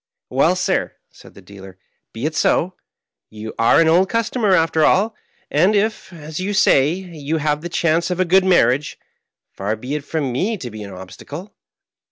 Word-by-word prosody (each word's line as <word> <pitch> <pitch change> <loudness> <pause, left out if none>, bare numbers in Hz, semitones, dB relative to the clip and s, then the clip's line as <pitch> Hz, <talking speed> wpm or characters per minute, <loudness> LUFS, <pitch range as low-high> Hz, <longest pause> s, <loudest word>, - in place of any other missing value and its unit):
" - - -69
Well, - - +3
sir," - - -1 0.2
said - - -17
the 100 - -15
dealer, 95 -1 -13 0.2
" - - -53
be 115 +5 -5
it 155 0 -2
so. 180 +4 +1 0.6
You 110 0 -8
are 115 - +4
an 165 - +4
old 180 +4 +3
customer 230 -3 +1
after 160 -2 +2
all; 210 +7 +3 0.4
and 180 +8 +3
if, 215 0 -1
as 155 -2 -8
you 200 +2 -2
say, 140 -6 +4
you 165 -4 -4
have 150 -1 -1
the 175 - -6
chance 170 0 +1
of 180 0 -3
a 185 - +3
good 190 +2 +4
marriage, 145 -6 +2 0.5
far 100 +3 -3
be 125 +6 -6
it 150 -1 -3
from 145 -3 -2
me 195 - -1
to 125 -9 -7
be 110 0 -9
an 100 -1 -8
obstacle. 140 - -10
160 Hz, 195 wpm, -19 LUFS, 125-185 Hz, 0.6 s, are